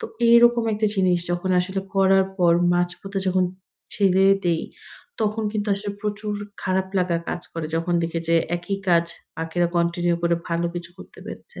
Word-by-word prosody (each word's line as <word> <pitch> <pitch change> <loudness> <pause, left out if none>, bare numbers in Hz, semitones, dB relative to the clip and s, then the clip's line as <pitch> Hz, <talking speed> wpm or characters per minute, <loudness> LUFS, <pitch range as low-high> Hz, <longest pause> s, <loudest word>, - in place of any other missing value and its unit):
তো 450 - -5 0.2
এইরকম 235 0 +6
একটা 215 +1 +1
জিনিস 185 -3 +2
যখন 175 +2 -1
আসলে 190 +2 -3
করার 195 0 +4
পর 175 -2 +5 0.2
মাঝপথে 180 +3 -2
যখন 185 0 +2 0.5
ছেলেই 195 -1 +4
দেই 170 -2 +1 0.6
তখন 215 +1 0
কিন্তু 210 -1 -2
আসলে 205 +1 -5
প্রচুর 210 0 -3 0.3
খারাপ 190 0 0
লাগা 180 -2 +1
কাজ 175 - -3
করে, 165 -2 -4
যখন 175 +1 -1
দেখি 165 0 -2
যে, 170 - +3 0.2
একই 185 +3 -4
কাজ 170 -1 +4 0.3
বাকিরা 165 +2 0
continue 170 0 +1
করে 170 0 +3
ভালো 170 0 0
কিছু 175 0 -6
করতে - - -14
পেরেছে। - - -9
185 Hz, 165 wpm, -23 LUFS, 170-200 Hz, 0.6 s, এইরকম